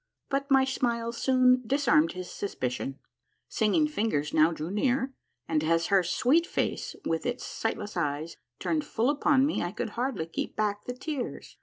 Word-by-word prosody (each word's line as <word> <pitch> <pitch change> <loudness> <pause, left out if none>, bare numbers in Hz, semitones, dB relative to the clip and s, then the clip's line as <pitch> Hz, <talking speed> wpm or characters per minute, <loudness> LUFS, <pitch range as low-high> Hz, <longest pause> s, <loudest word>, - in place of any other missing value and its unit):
But 280 +1 -1
my 270 -1 +5
smile 235 -3 -1
soon 255 +1 +3
disarmed 240 - +3
his 180 0 -6
suspicion. 135 -7 -3 0.5
Singing 235 +8 +2
Fingers 210 - -1
now 155 +2 +5
drew 160 +1 -5
near, 260 +5 +1 0.3
and 155 -2 +1
as 165 +1 +2
her 195 - +6
sweet 265 - +2
face - - -2
with 165 0 0
its 245 0 -3
sightless 210 -2 -3
eyes 155 -1 -2 0.2
turned 310 -2 -1
full 240 +2 +1
upon 285 -2 +3
me 295 - 0
I 175 - -2
could 215 - -3
hardly 245 -8 -2
keep 165 - -4
back 205 -1 -1
the 250 - -3
tears. 275 -1 -5
230 Hz, 165 wpm, -28 LUFS, 165-265 Hz, 0.5 s, her